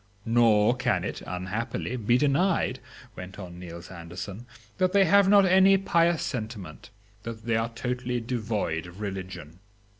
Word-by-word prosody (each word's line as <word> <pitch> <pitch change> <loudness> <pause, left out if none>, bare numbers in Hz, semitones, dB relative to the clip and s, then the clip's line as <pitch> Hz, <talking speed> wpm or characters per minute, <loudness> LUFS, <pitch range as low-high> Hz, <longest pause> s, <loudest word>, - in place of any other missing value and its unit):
Nor 115 -1 +4
can 120 -2 0
it, - - -5
unhappily, 105 +7 -3
be 120 0 +2
denied," 145 -1 +1 0.4
went 90 0 -9
on 90 -3 -9
Niels 85 0 -9
Anderson, 95 +6 -8 0.3
"that 185 0 +2
they 200 -1 +5
have 200 +2 +5
not 200 -1 +6
any 190 +1 +6
pious 170 -3 +2
sentiment, 110 -6 -6 0.3
that 115 -1 -8
they 115 -1 +1
are 115 +1 0
totally 125 +1 -3
devoid 110 -8 -2
of 90 +3 -13
religion...." 95 -5 -6
115 Hz, 145 wpm, -27 LUFS, 95-130 Hz, 0.4 s, not